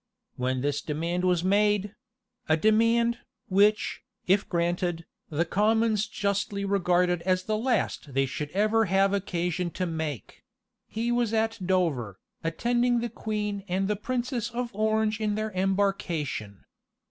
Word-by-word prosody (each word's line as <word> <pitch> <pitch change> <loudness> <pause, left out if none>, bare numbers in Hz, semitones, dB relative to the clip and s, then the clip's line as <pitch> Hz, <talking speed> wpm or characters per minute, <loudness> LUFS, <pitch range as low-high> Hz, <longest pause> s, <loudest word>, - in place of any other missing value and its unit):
When 130 0 -1
this 145 +1 -1
demand 170 +4 -2
was 180 -2 +2
made, 205 +1 +2 0.6
a 155 - +4
demand, 230 +4 +3 0.3
which, 205 +3 +3 0.2
if 190 +2 +2
granted, 175 -1 -1 0.2
the 160 +2 0
commons 215 +3 +2
justly 200 -1 -1
regarded 180 -3 +2
as 185 +1 +1
the 215 +2 -1
last 220 - -1
they 135 0 +3
should 145 +3 -4
ever 215 +5 +2
have 195 +1 +3
occasion 180 -2 -1
to 185 - 0
make, 160 -6 -5 0.5
he 230 +2 -2
was 240 -2 +1
at 225 0 0
Dover, 160 - 0 0.3
attending 240 +8 +1
the 235 0 -2
queen 210 -2 -3
and 190 +1 0
the 210 - +1
princess 245 +2 -2
of 240 -1 -4
Orange 215 0 +1
in 210 -1 0
their 215 0 -2
embarkation. 185 - -1
200 Hz, 135 wpm, -27 LUFS, 175-220 Hz, 0.6 s, a